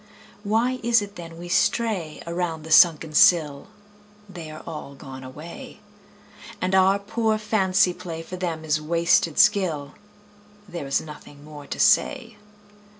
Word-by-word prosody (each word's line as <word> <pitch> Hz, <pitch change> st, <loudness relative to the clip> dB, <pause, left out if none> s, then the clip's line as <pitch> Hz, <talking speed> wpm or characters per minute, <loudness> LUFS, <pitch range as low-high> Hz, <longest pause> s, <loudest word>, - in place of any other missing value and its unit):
Why 230 Hz, +5 st, 0 dB
is 230 Hz, -2 st, +3 dB
it 205 Hz, 0 st, -10 dB
then 165 Hz, -2 st, -10 dB
we 175 Hz, +1 st, -9 dB
stray 180 Hz, -3 st, -1 dB
Around 170 Hz, -2 st, -3 dB
the 160 Hz, -, -9 dB
sunken 160 Hz, -2 st, +5 dB
sill? 150 Hz, -3 st, +4 dB, 0.6 s
They 175 Hz, -5 st, -9 dB
are 155 Hz, 0 st, -10 dB
all 150 Hz, -4 st, -8 dB
gone 135 Hz, -2 st, -10 dB
away. 150 Hz, +6 st, -10 dB, 0.8 s
And 185 Hz, +1 st, -2 dB
our 190 Hz, +1 st, +4 dB
poor 220 Hz, +2 st, -1 dB
fancy 195 Hz, -3 st, +1 dB
play 170 Hz, -2 st, -7 dB
For 185 Hz, -, -8 dB
them 170 Hz, -3 st, -4 dB
is 155 Hz, 0 st, 0 dB
wasted 165 Hz, 0 st, +1 dB
skill: 180 Hz, -9 st, +2 dB, 0.7 s
There 170 Hz, -7 st, -7 dB
is 135 Hz, -, 0 dB
nothing 150 Hz, -2 st, -12 dB
more 150 Hz, -2 st, -11 dB
to -, -, -6 dB
say. 235 Hz, -6 st, +2 dB
170 Hz, 145 wpm, -23 LUFS, 155-200 Hz, 0.8 s, sunken